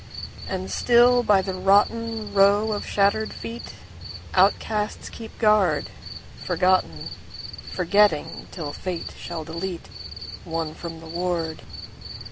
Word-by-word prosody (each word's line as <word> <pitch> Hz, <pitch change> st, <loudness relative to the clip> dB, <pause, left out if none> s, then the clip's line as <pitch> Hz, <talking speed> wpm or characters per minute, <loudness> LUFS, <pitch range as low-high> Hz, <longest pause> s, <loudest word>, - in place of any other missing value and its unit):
And 95 Hz, +1 st, -3 dB
still 245 Hz, -, +5 dB
by 205 Hz, -5 st, +4 dB
the 190 Hz, -, -3 dB
rottenRow 205 Hz, +1 st, +3 dB
of 205 Hz, -, -4 dB
shattered 205 Hz, +2 st, +2 dB
feet, 230 Hz, +1 st, -7 dB, 0.6 s
Outcasts 210 Hz, -1 st, +1 dB
keep 225 Hz, -1 st, -10 dB
guard. 210 Hz, -4 st, +3 dB, 0.5 s
Forgotten, 180 Hz, -, +1 dB, 0.6 s
Forgetting, 185 Hz, -3 st, +2 dB
till 150 Hz, -5 st, -5 dB
fate 180 Hz, -3 st, -5 dB
shall 165 Hz, -3 st, -6 dB
deleteOne 165 Hz, -2 st, -6 dB
from 165 Hz, -1 st, -7 dB
the -, -, -11 dB
ward. 170 Hz, -1 st, -2 dB
190 Hz, 95 wpm, -24 LUFS, 165-215 Hz, 0.6 s, still